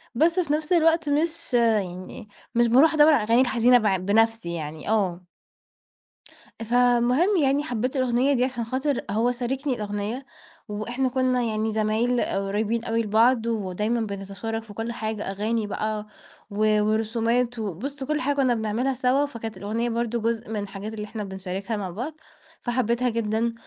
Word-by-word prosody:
بس 335 +7 +3
في 305 -4 0
نفس 310 +3 0
الوقت 325 -2 +3
مش 325 0 -1
يعني 210 -4 0 0.3
مش 235 0 +4
باروح 270 +8 +5
أدور 305 0 +6
على 230 - +3
الأغاني 230 +3 +4
الحزينة 245 -1 +4
بع 210 -5 +2
بنفسي 215 0 +1
يعني، 155 +2 -6
آه. 185 -5 0 1.4
فالمهم 245 - +3
يعني 275 +2 +2
حبيت 250 0 -2
الأغنية 255 +2 +2
دي 250 -2 +2
عشان 250 -2 -2
خاطر 260 +4 -1
هو 230 +4 +1
شاركني 260 +3 -2
الأغنية 210 +4 -4 0.4
وإحنا 240 +5 -2
كنا 255 -1 +1
يعني 220 -1 -1
زمايل 220 +3 +1
قريبين 210 +4 -1
أوي 230 0 0
لبعض، 230 +2 +3
ودايمًا 215 +1 -1
بنتشارك 200 +2 -4
في 220 - -12
كل 225 +2 -3
حاجة، 215 -3 -4
أغاني 215 +3 -1
بقى 215 +1 -3 0.4
و 215 +1 +2
ورسومات 230 +3 0
وبُص 230 - -4
كل 300 +2 -1
حاجة 285 +2 0
كنا 260 -3 +3
بنعملها 225 +4 -1
سوا، 260 +3 +2
فكانت 225 -5 -7
الأغنية 225 +4 -2
برضه 235 0 -1
جزء 230 +1 -2
من 220 - -3
الحاجات 200 +2 -7
اللي 210 -1 -5
إحنا 210 0 -6
بنشاركها 190 +3 -4
مع 190 -3 -4
بعض، 245 - -5 0.5
فحبيتها 240 0 0
جدًا، 230 0 0
230 Hz, 155 wpm, -25 LUFS, 215-255 Hz, 1.4 s, أدور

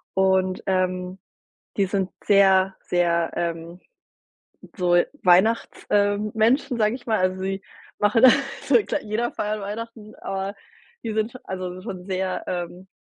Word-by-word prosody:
und 190 -1 +2
ähm, 185 0 -1 0.6
die 200 - +3
sind 190 -1 -1
sehr 195 -1 +4
sehr 170 -1 +1
ähm, 170 +1 -4 0.9
so 175 -2 +3 0.2
Weihnachts 190 +6 +3
ähm, 205 +1 +1
Menschen, 240 +3 +2
sage 215 +1 +2
ich 250 - -12
mal. 220 -1 +2
Also 185 0 0
sie 195 0 -3 0.3
machen 210 +3 +2
da 260 - +11 0.3
so, - - +2
klei - - -2
jeder 220 +3 -2
feiert 210 0 -3
Weihnachten, 215 +1 -7
aber 195 +1 -3 0.5
die 225 - -3
sind 220 +2 -1
sch 255 - -10
also 185 -1 -5
schon 185 -1 -7
sehr 185 -1 -2
ähm, 180 +1 -5
190 Hz, 145 wpm, -23 LUFS, 185-215 Hz, 0.9 s, da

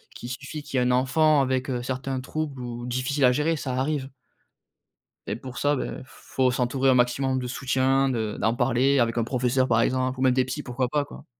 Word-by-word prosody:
qu'il 120 - -8
suffit 140 +4 -6
qu'il 135 - -2
y - - +2
ait - - +2
un 125 - +2
enfant 140 +4 +3
avec, 130 0 -1
heu, 125 -2 -2
certains 130 +1 -3
troubles 145 0 -4
ou 120 0 -6
difficiles 130 +3 0
à 125 - +6
gérer. 150 +5 +1
Ça 135 -3 -4
arrive 135 +1 -1 1.2
et - - -2
pour 125 +1 -9
ça, 145 0 +2
beh, 130 - -3 0.2
f - - -19
faut 130 -1 +4
s'entourer 130 +2 +1
au 130 - +5
maximum 130 +2 +1
de 125 - -4
soutien, 130 +1 +1
de 110 -4 -2
d'en 110 +3 +1
parler 130 +2 +2
avec 115 -1 +1
un 115 - +2
professeur, 125 +1 +1
par 115 -2 +3
exemple, 130 +1 0
ou - - -3
même 130 -1 +4
des 130 0 +2
psys. 145 +3 -5
Pourquoi 125 0 -2
pas? 145 +1 +1
Quoi. 145 - -12
130 Hz, 225 wpm, -25 LUFS, 125-135 Hz, 1.2 s, à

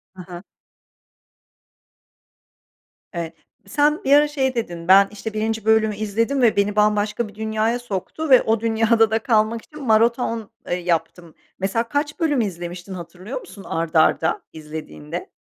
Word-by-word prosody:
Hı 185 - -9
hı. 175 +1 -10 2.7
Evet, 170 -2 -4 0.3
sen 295 +1 +1
bir 275 - +3
ara 295 +1 +6
şey 265 -3 -1
dedin, 175 -7 -4
"Ben, 195 +1 +7
işte, 215 +1 -6
1'inci 220 0 -2
bölümü 220 -1 +3
izledim 225 +6 -1
ve 235 -3 +4
beni 200 +1 +1
bambaşka 210 +2 +1
bir 205 - -15
dünyaya 220 +2 -1
soktu 240 - -5
ve 260 -2 +8
o 225 0 +1
dünyada 225 0 +2
da 225 - +2
kalmak 225 -2 +1
için 300 -1 -12
maraton, 230 0 +2 0.2
eee, 175 - +1
yaptım." 170 -1 -3 0.2
Mesela 225 +5 -1
kaç 290 +4 -2
bölüm 295 -6 +2
izlemiştin 175 -1 -5
hatırlıyor 180 - -7
musun 350 - -13
art 165 0 -3
arda 160 +1 +3
izlediğinde? 150 - -7
215 Hz, 145 wpm, -22 LUFS, 180-235 Hz, 2.7 s, ve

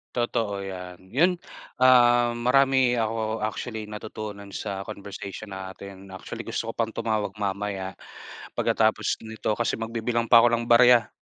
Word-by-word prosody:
Totoo 115 -5 -1
yan, 95 -1 -9
yun, 170 +9 +4 0.4
ah, 120 -1 +5
marami 130 +1 +3
ako 110 -1 -1
actually, 110 +1 -4
natutunan 105 -1 -7
sa 100 -2 -4
conversation 100 0 -8
natin. 95 0 -9
Actually, 95 -1 -8
gusto 115 - -3
ko - - -22
pang 115 -1 -1
tumawag 105 -3 -1
mamaya, 100 -1 -3 0.6
pagkatapos - - +1
nito, 110 0 -3
kasi 115 - +1
magbibilang 115 +1 -2
pa 115 - +10
ako 120 0 +4
ng 115 0 -3
barya. 120 -1 +6
110 Hz, 135 wpm, -25 LUFS, 100-120 Hz, 0.6 s, pa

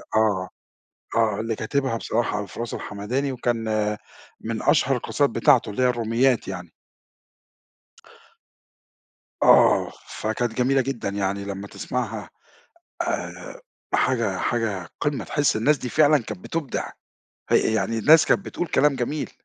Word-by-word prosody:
آه، 105 -4 +2 0.7
آه 110 -2 +2
اللي 115 -1 -2
كاتبها 130 +1 -1
بصراحة 115 -2 -1
أبو 100 - -4
فراس 115 +2 -6
الحمداني 125 +7 -3
وكان 120 -2 -1 0.8
من - - -4
أشْهر - - +3
القَصائِد - - 0
بتاعته - - +3
اللي 115 +5 -2
هي 125 - +4
الروْمِيَّات 120 +1 +1
يعني. - - -6 2.7
آه - - +5 0.3
فكانت 115 +1 -1
جميلة 135 +2 +2
جدًا 125 -5 -3
يعني 100 0 -2
لمّا 100 0 -6
تسمعها 110 -6 -4 0.7
آآ - - -4 0.5
حاجة 115 -7 +1
حاجة 105 -7 -2
قِمَّة 145 -2 -1
تحس 145 -5 +1
الناس 145 +7 +3
دي 125 - -5
فعلًا 150 +1 +5
كانت 110 -6 -6
بِتبْدع، 165 -5 -3 0.6
يعني 110 +1 +2
الناس 155 +7 +6
كانت 195 - +2
بتقول 175 - -3
كلام 145 -2 +3
جميل. 145 +5 -3
115 Hz, 125 wpm, -24 LUFS, 105-135 Hz, 2.7 s, الناس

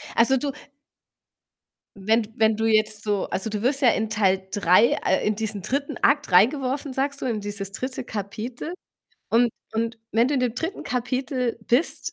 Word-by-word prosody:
Also, 265 +3 +4
du 280 +2 -2 1.5
wenn 220 +4 +2
d 210 - -12
wenn 220 -1 +3
du 225 - 0
jetzt 215 -1 +2
so 205 -2 0
also, 205 +3 -2
du 210 -1 -3
wirst 275 +3 +1
ja 250 - +6
in 220 0 0
Teil 190 -3 +1
3 200 +3 +4
äh, 190 - +2
in 210 - +1
diesen 215 -2 -4
3. 280 +2 -2
Akt 290 -5 +2
reingeworfen, 260 +7 +2
sagst 280 +1 -2
du, - - -3
in 225 -4 -1
dieses 200 -1 -5
3. 255 +4 -4
Kapitel 220 - -5 0.6
und 240 +1 +4 0.3
und 230 +1 -2
wenn 230 +3 +3
du 290 - 0
in 260 - +1
dem 245 -2 0
3. 325 +8 -4
Kapitel 250 -1 -2
bist 255 +8 +1
230 Hz, 180 wpm, -24 LUFS, 210-260 Hz, 1.5 s, ja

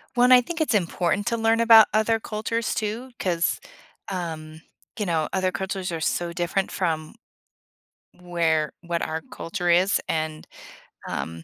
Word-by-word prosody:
When 245 +1 +4
I 250 -1 +9
think 325 +6 -5
it's 300 -7 +1
important 180 +1 0
to 235 - +1
learn 225 0 +2
about 225 -1 +8
other 220 +1 +2
cultures 220 +2 -3
too, 225 +4 -3
'cause, 170 -2 0 0.5
um, 160 -4 -5 0.4
you 210 - 0
know, 160 -3 0
other 185 -1 +1
cultures 190 -1 -3
are 165 - -3
so 170 +2 -1
different 175 +3 -1
from 160 -2 -2 1.0
where 170 -3 0
what 170 -1 -2
our 160 +1 -3
culture 175 0 -2
is, 185 +4 +4
and, 155 -1 -3 0.6
um, 80 0 -5
180 Hz, 145 wpm, -24 LUFS, 165-220 Hz, 1.0 s, I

